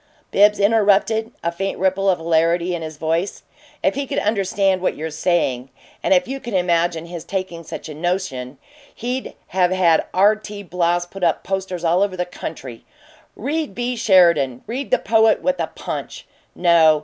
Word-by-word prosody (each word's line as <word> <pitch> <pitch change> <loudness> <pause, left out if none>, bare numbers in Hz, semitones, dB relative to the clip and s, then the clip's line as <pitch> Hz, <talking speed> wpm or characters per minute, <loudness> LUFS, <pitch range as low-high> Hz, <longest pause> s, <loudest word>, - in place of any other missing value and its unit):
Bibbs 210 +1 +5
interrupted, 220 +1 +2
a 170 - 0
faint 195 +3 -3
ripple 190 +1 +1
of 185 - +3
hilarity 170 +2 +1
in 170 - -3
his 155 -1 -7
voice. 165 +5 -2 0.4
"If - - +3
he 280 0 -3
could - - -3
understand 195 -2 +1
what 185 - 0
you're 160 +1 -5
saying 150 -6 0 0.3
and - - -1
if 270 -3 +4
you 270 +2 -4
can 235 -5 -5
imagine 170 -2 +1
his 170 -1 -7
taking 185 -2 -4
such - - -8
a 155 - -7
notion, 150 -6 -3 0.4
he'd 250 +3 -4
have 180 -1 +2
had 180 -3 +3
R. 200 +3 +4
T. 210 -1 -9
Bloss 175 -1 0
put 185 +1 -9
up 165 -3 +1
posters 190 -2 -3
all 170 +2 +2
over 200 -2 0
the 180 - -1
country: 130 -8 -8 0.5
'Read 300 +6 -3
B. 245 +1 -2
Sheridan. 170 - +3
Read 255 +5 -4
the - - +4
Poet 220 +1 +3
with 275 0 0
a - - 0
Punch!' - - -7 0.3
No. 165 -3 +5
185 Hz, 175 wpm, -20 LUFS, 170-205 Hz, 0.5 s, Bibbs